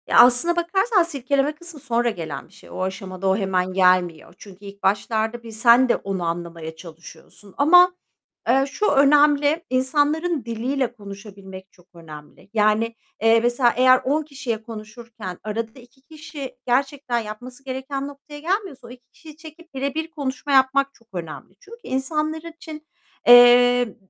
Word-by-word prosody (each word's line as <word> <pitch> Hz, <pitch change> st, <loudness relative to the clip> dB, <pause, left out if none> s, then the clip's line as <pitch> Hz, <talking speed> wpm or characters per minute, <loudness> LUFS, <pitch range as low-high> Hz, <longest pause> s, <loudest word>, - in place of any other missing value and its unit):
Ya, -, -, +4 dB
aslında 250 Hz, +8 st, +5 dB
bakarsan 385 Hz, +4 st, +1 dB
silkeleme 280 Hz, -2 st, -1 dB
kısmı 340 Hz, -1 st, -11 dB
sonra 240 Hz, -3 st, 0 dB
gelen 170 Hz, -7 st, -7 dB
bir 170 Hz, -, -26 dB
şey. -, -, -17 dB
O -, -, -7 dB
aşamada 190 Hz, 0 st, -4 dB
o 190 Hz, 0 st, +2 dB
hemen 185 Hz, -2 st, -1 dB
gelmiyor. 180 Hz, -3 st, +1 dB
Çünkü 200 Hz, 0 st, -14 dB
ilk 200 Hz, 0 st, -12 dB
başlarda 220 Hz, +3 st, -1 dB
bir 230 Hz, -, -10 dB
sen 235 Hz, +3 st, +4 dB
de -, -, +4 dB
onu 195 Hz, -2 st, -4 dB
anlamaya 165 Hz, -1 st, -5 dB
çalışıyorsun 170 Hz, +4 st, -14 dB
ama, 360 Hz, +5 st, +6 dB, 0.5 s
eee, 265 Hz, +3 st, +3 dB
şu 420 Hz, +8 st, -1 dB
önemli, 290 Hz, +2 st, +3 dB
insanların 290 Hz, +4 st, 0 dB
diliyle 240 Hz, +3 st, -2 dB
konuşabilmek 195 Hz, -3 st, -12 dB
çok 180 Hz, -1 st, -25 dB
önemli. 155 Hz, +1 st, -13 dB
Yani, 220 Hz, +1 st, +1 dB, 0.3 s
eee, 225 Hz, +1 st, +5 dB
mesela 240 Hz, 0 st, +2 dB
eğer 255 Hz, 0 st, +5 dB
10 295 Hz, +4 st, 0 dB
kişiye 265 Hz, -7 st, -5 dB
konuşurken 220 Hz, -3 st, -9 dB
arada 225 Hz, +3 st, -5 dB
2 245 Hz, +2 st, -20 dB
kişi 295 Hz, -3 st, -10 dB
gerçekten 265 Hz, -1 st, 0 dB
yapması 245 Hz, +5 st, -9 dB
gereken 270 Hz, +1 st, -5 dB
noktaya 285 Hz, +1 st, -12 dB
gelmiyorsa 370 Hz, -2 st, -3 dB
o -, -, -13 dB
2 245 Hz, 0 st, -15 dB
kişiyi 310 Hz, -2 st, -15 dB
çekip 325 Hz, +1 st, -15 dB
birebir 280 Hz, +5 st, -3 dB
konuşma 285 Hz, -2 st, -5 dB
yapmak 275 Hz, +1 st, +3 dB
çok 230 Hz, -, -26 dB
önemli. 175 Hz, +1 st, -8 dB
Çünkü 465 Hz, -, -14 dB
insanlar 305 Hz, +4 st, -2 dB
için, 315 Hz, -2 st, -11 dB, 0.4 s
eee, 245 Hz, -1 st, +7 dB
245 Hz, 150 wpm, -22 LUFS, 210-290 Hz, 0.5 s, eee